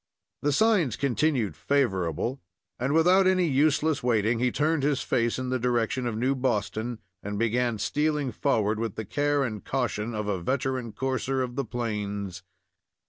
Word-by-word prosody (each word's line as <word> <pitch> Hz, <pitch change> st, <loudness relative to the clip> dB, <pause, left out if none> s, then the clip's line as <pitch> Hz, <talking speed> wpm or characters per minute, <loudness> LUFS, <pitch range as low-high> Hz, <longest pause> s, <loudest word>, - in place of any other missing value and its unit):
The 145 Hz, -, +1 dB
signs 180 Hz, -, +3 dB
continued 130 Hz, -, 0 dB
favorable, 110 Hz, -, 0 dB, 0.4 s
and, 130 Hz, +3 st, 0 dB
without 180 Hz, +5 st, +5 dB
any 185 Hz, -1 st, +3 dB
useless 150 Hz, +1 st, +2 dB
waiting, 115 Hz, -1 st, +1 dB
he 125 Hz, 0 st, +2 dB
turned 155 Hz, +2 st, +1 dB
his 140 Hz, -1 st, +1 dB
face 115 Hz, -2 st, +1 dB
in 130 Hz, 0 st, -3 dB
the 130 Hz, 0 st, 0 dB
direction 120 Hz, +1 st, 0 dB
of 110 Hz, -2 st, -2 dB
New 130 Hz, +4 st, +1 dB
Boston 120 Hz, -2 st, -1 dB, 0.2 s
and 105 Hz, 0 st, -4 dB
began 115 Hz, +1 st, +1 dB
stealing 150 Hz, +5 st, 0 dB
forward, 110 Hz, -6 st, +1 dB
with 115 Hz, -3 st, -3 dB
the 110 Hz, -, -4 dB
care 145 Hz, +5 st, +1 dB
and 110 Hz, -5 st, -4 dB
caution 120 Hz, -4 st, -2 dB
of 105 Hz, -1 st, -3 dB
a 95 Hz, -4 st, -1 dB
veteran 130 Hz, +2 st, -1 dB
courser 130 Hz, +1 st, -1 dB
of 120 Hz, -1 st, -5 dB
the 140 Hz, -1 st, -1 dB
plains. 105 Hz, -5 st, -4 dB
125 Hz, 160 wpm, -27 LUFS, 110-140 Hz, 0.4 s, without